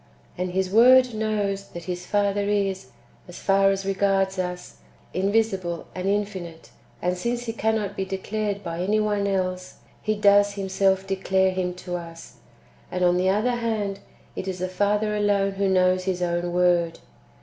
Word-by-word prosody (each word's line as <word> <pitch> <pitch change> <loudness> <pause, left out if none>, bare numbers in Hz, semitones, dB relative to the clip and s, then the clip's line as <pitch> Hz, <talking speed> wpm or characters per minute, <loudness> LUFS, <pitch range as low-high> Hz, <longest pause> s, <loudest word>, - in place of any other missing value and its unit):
And 180 0 -3
His 190 0 0
Word 250 +3 +6
knows 205 -2 -1
that 170 - -9
His 180 +1 -5
Father 205 0 +1
is, 195 -2 -1 0.4
as 175 - -10
far 195 0 +3
as 195 0 -1
regards 195 -1 +1
us, 180 -1 -5 0.4
invisible 195 -3 0
and 185 +1 -4
infinite; 190 -5 -3 0.3
and 180 +1 +1
since 235 +6 -2
He 225 - -3
cannot 220 -3 -1
be 195 - -2
declared 200 +2 -3
[by 170 0 -4
any 210 +4 +1
one 205 -1 0
else], 185 -2 -2 0.3
He 215 0 0
does 205 0 +4
Him 195 -1 -4
self 190 0 +2
declare 190 0 +1
Him 180 -1 -2
to 180 -1 -2
us; 165 -1 -11 0.5
and, 180 0 -1
on 175 0 +4
the 185 +1 +2
other 225 +5 +1
hand, 215 -4 -2 0.4
it 190 - -5
is 185 -1 -3
the 185 0 -2
Father 205 +3 0
alone 205 -1 +2
who 195 0 -1
knows 185 0 +2
His 180 -2 -1
own 175 0 -1
Word. 175 -2 +2
195 Hz, 170 wpm, -24 LUFS, 185-205 Hz, 0.5 s, Word